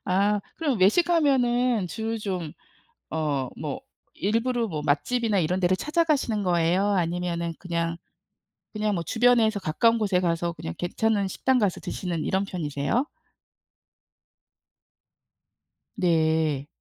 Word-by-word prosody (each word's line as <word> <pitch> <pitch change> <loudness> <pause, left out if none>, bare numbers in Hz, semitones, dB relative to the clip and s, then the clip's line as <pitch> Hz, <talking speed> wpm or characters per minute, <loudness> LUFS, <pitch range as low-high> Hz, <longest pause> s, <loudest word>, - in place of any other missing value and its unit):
아, 200 +3 +2 0.2
그럼 285 - 0
외식하면은 250 - +3
주로 225 +4 -3
좀 185 -7 -4 0.6
어 145 -5 -1
뭐 - - -4 0.3
일부러 230 +3 0
뭐 155 -5 -4
맛집이나 215 +9 +1
이런 180 +3 0
데를 185 0 +2
찾아가시는 300 - 0
거예요? 175 +2 +2
아니면은 170 -2 -1
그냥, 170 -1 -2 0.8
그냥 210 0 0
뭐 170 - -2
주변에서 225 -2 +3
가까운 230 +9 +2
곳에 200 -4 +1
가서 170 -1 0
그냥 80 - -7
괜찮은 200 +2 0
식당 260 +6 +1
가서 205 -5 0
드시는 170 -4 -4
이런 190 +1 0
편이세요? 165 - -1 2.9
네. 160 - +1
190 Hz, 255 characters per minute, -25 LUFS, 170-230 Hz, 2.9 s, 외식하면은